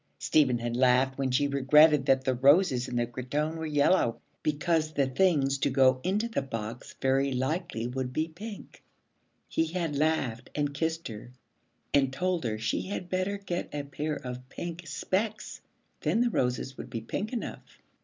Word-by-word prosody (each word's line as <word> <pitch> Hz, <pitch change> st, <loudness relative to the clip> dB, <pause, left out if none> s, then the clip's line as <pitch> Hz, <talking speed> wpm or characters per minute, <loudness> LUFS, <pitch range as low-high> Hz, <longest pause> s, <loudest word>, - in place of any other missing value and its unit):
Stephen 135 Hz, -6 st, +3 dB
had 120 Hz, 0 st, -3 dB
laughed 130 Hz, +1 st, +3 dB
when 135 Hz, -1 st, +1 dB
she 130 Hz, +3 st, +2 dB
regretted 145 Hz, +1 st, +5 dB
that 135 Hz, -1 st, +4 dB
the 130 Hz, -, +1 dB
roses 135 Hz, 0 st, +4 dB
in 125 Hz, -, -5 dB
the 120 Hz, 0 st, +2 dB
cretonne 130 Hz, +6 st, -3 dB
were 160 Hz, -1 st, -4 dB
yellow, 145 Hz, -4 st, +2 dB, 0.2 s
because 155 Hz, +1 st, 0 dB
the 140 Hz, -2 st, +2 dB
things 140 Hz, -1 st, +2 dB
to -, -, +2 dB
go 130 Hz, -1 st, +4 dB
into 205 Hz, +5 st, 0 dB
the 230 Hz, -, -1 dB
box 115 Hz, -2 st, -6 dB
very 135 Hz, +1 st, +2 dB
likely 135 Hz, -1 st, -2 dB
would 125 Hz, +1 st, -3 dB
be 155 Hz, +5 st, -1 dB
pink. 200 Hz, +6 st, -10 dB, 0.7 s
He 160 Hz, -, +1 dB
had 165 Hz, -3 st, -2 dB
laughed 140 Hz, -6 st, 0 dB
and 145 Hz, -1 st, 0 dB
kissed 160 Hz, +3 st, -2 dB
her 110 Hz, +2 st, -9 dB, 0.6 s
and 135 Hz, -2 st, +3 dB
told 175 Hz, +3 st, -1 dB
her 110 Hz, -2 st, -1 dB
she 110 Hz, +1 st, -1 dB
had 185 Hz, -2 st, -5 dB
better 185 Hz, +2 st, 0 dB
get 180 Hz, -3 st, -4 dB
a 145 Hz, -, -2 dB
pair 150 Hz, +2 st, -3 dB
of 125 Hz, -1 st, -7 dB
pink 170 Hz, +3 st, -6 dB
specs, 205 Hz, +9 st, -2 dB, 0.4 s
then 230 Hz, -, +1 dB
the 240 Hz, -1 st, +2 dB
roses 125 Hz, -, -1 dB
would 125 Hz, -, -7 dB
be 115 Hz, -2 st, -4 dB
pink 195 Hz, -, -4 dB
enough. 245 Hz, -, -6 dB
140 Hz, 175 wpm, -29 LUFS, 130-165 Hz, 0.7 s, regretted